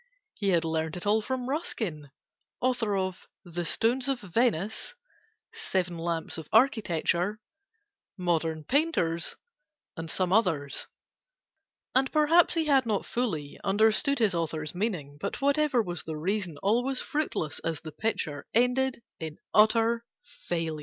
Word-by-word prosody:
He 200 -2 -1
had 170 -3 +2
learnt 160 0 -1
it 175 - -6
all 215 +2 +3
from 255 +2 -3
Ruskin 215 - -2 0.5
(Author 245 -5 +1
of 185 -1 -3 0.2
'The 175 0 -4
Stones 245 - +2
of 270 -2 +1
Venice,' 215 - 0 0.6
'Seven 190 - -1
Lamps 165 0 -2
of 155 - -10
Architecture,' 210 - +2 0.8
'Modern 165 -3 0
Painters,' 250 - +1 0.6
and 165 -1 -5
some 185 +1 +2
others); 165 -10 +1 1.1
And 265 +1 +2
perhaps 320 +3 +4
he 325 -1 +1
had 270 -4 +3
not 210 -3 0
fully 165 - -3
Understood 220 +8 +3
his 220 -5 +3
author's 160 -2 -2
meaning; 175 -8 -3
But, - - -3
whatever 280 -3 +2
was 175 -3 -3
the 160 -1 -6
reason, 185 -1 -2
All 220 +5 +3
was 265 0 0
fruitless, 290 - -2
as 165 -2 -3
the 160 - -8
picture 150 -8 -2
Ended 250 +1 +2 0.2
in 160 -2 -5
an - - -22 0.2
utter 225 +2 +4 0.2
failure. 165 - -4
200 Hz, 140 wpm, -28 LUFS, 165-250 Hz, 1.1 s, perhaps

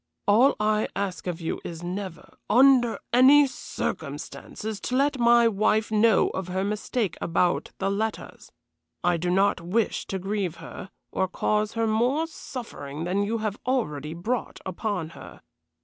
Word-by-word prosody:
All 235 +7 +5
I 215 0 +1
ask 195 -2 -3
of 175 -1 -3
you 165 - -3
is 170 0 -7
never, 185 0 -6
under 245 0 +5 0.2
any 275 +4 +7
circumstances, 220 -4 -5
to 250 - -3
let 280 0 +2
my 235 0 +6
wife 215 +1 +1
know 220 0 +4
of 190 -1 -4
her 185 +1 -1
mistake 210 -1 -2
about 175 +1 +1
the 195 +1 -1
letters. 220 +2 -4 0.5
I 175 -1 +3
do 175 +2 -2
not 195 0 +2
wish 200 +6 -1
to 195 - -2
grieve 190 -2 -2
her, 185 - -9 0.2
or 190 - 0
cause 210 +3 0
her 230 0 0
more 245 +8 +1
suffering 195 - -7
than 185 +3 0
you 215 +3 0
have 210 -1 -2
already 155 - -2
brought 220 +7 -3
upon 185 -3 -3
her. - - -12
210 Hz, 150 wpm, -26 LUFS, 180-235 Hz, 0.5 s, any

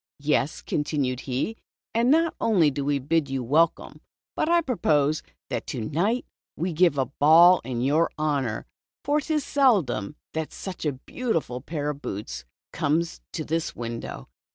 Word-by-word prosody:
"Yes," 145 0 0
continued 140 -4 -1
he, 135 - -1 0.4
"and 235 +2 +2
not 325 +3 +4
only 180 -10 +4
do 140 +1 -3
we 145 0 +1
bid 145 +2 0
you 135 -1 -2
welcome, 155 +7 +1 0.3
but 310 - 0
I 340 0 +5
propose 155 - +1 0.3
that - - -3
to - - -4
night 180 - 0 0.3
we 175 +2 -1
give 170 -2 +3
a 135 - +2
ball 160 +7 +6
in 125 -2 -3
your 150 +6 +3
honor, 140 -7 -1 0.4
for 295 +2 +2
't 315 - -6
is 300 - 0
seldom 195 - +2 0.2
that 160 -1 -3
such 185 -4 -5
a 145 - 0
beautiful 150 - -3
pair 150 0 -3
of 145 -1 -10
boots 100 - -5 0.3
comes 165 +3 0
to 155 - -3
this 165 +1 -2
window." 115 - -6
155 Hz, 160 wpm, -25 LUFS, 135-185 Hz, 0.4 s, ball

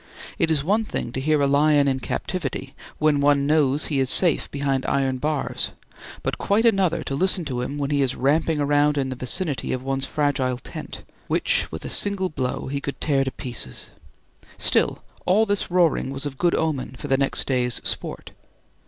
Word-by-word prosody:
It 165 -4 +2
is 150 -3 +2
one 210 +7 +2
thing 120 - -4
to 130 - -4
hear 155 +2 +2
a - - +4
lion 145 +1 +4
in 135 -1 +1
captivity, 140 -3 -4 0.2
when 150 -2 +2
one 140 -1 +3
knows 145 -1 +2
he 145 -3 -1
is 130 -1 +2
safe 170 0 +5
behind 140 -2 -1
iron 135 -2 0
bars; 150 0 -1 0.5
but - - -2
quite 210 +4 +2
another 195 -7 +2
to - - -4
listen 185 +3 +1
to 125 -4 -3
him 140 +4 -4
when 140 0 -2
he 145 -1 +2
is 130 -2 0
ramping 150 +3 +1
around 145 +1 +2
in 135 -1 0
the 130 - -4
vicinity 135 +2 -2
of 130 0 -4
one's 135 0 -2
fragile 135 -4 0
tent, 125 - -9 0.2
which - - +1
with 80 - -6
a - - -4
single 200 -2 +1
blow 130 -5 -3
he 140 +1 -3
could 140 - -5
tear 140 -3 +2
to 135 - -2
pieces. 120 - -5 0.7
Still, - - +2 0.2
all 210 +5 +4
this 205 -2 -1
roaring 175 -6 +2
was 135 +1 -4
of 135 -2 -6
good 175 -1 +2
omen 140 -5 -2
for - - -6
the 135 - +3
next 135 0 0
day's 125 -2 0
sport. - - -4
140 Hz, 195 wpm, -23 LUFS, 135-160 Hz, 0.7 s, safe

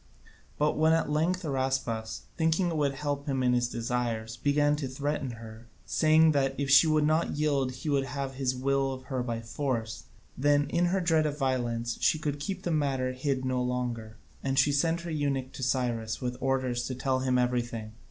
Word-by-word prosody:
But 150 +1 +1
when 160 +1 +5
at 165 -2 +1
length 175 +5 +1
Araspas, 130 -6 -2
thinking 165 +2 +2
it 165 - -3
would 145 -3 +1
help 145 0 -3
him 135 -2 0
in 125 0 +3
his 120 -1 +1
desires, 115 -2 -2
began 145 +3 +2
to 145 -3 -3
threaten 140 0 -3
her, 115 0 -11 0.2
saying 155 0 +4
that 135 -2 +1
if 140 -1 0
she 140 +4 +8
would 155 -1 +3
not 155 +2 +1
yield 140 -4 +1
he 130 +4 -5
would 140 -2 +2
have 135 -1 -4
his 130 -1 -1
will 135 +1 0
of 130 0 -8
her 130 -1 -3
by 115 -2 -3
force, 115 -2 -3 0.3
then 145 +1 +2
in 175 - +2
her 185 +2 +1
dread 160 -3 +3
of 150 0 -4
violence 120 -4 -1
she - - +3
could 145 -2 -3
keep 185 +6 -4
the 175 - -1
matter 135 -4 0
hid 130 0 -2
no 130 -1 0
longer, 120 -3 -3 0.3
and 135 0 -1
she 145 - +5
sent 165 +4 +1
her 170 0 -6
eunuch 140 -4 -1
to - - -9
Cyrus 120 -4 -1
with 125 -1 -3
orders 130 -2 0
to 130 - -4
tell 130 +1 0
him 130 -1 +1
everything. 120 -3 -1
135 Hz, 200 wpm, -29 LUFS, 125-150 Hz, 0.3 s, she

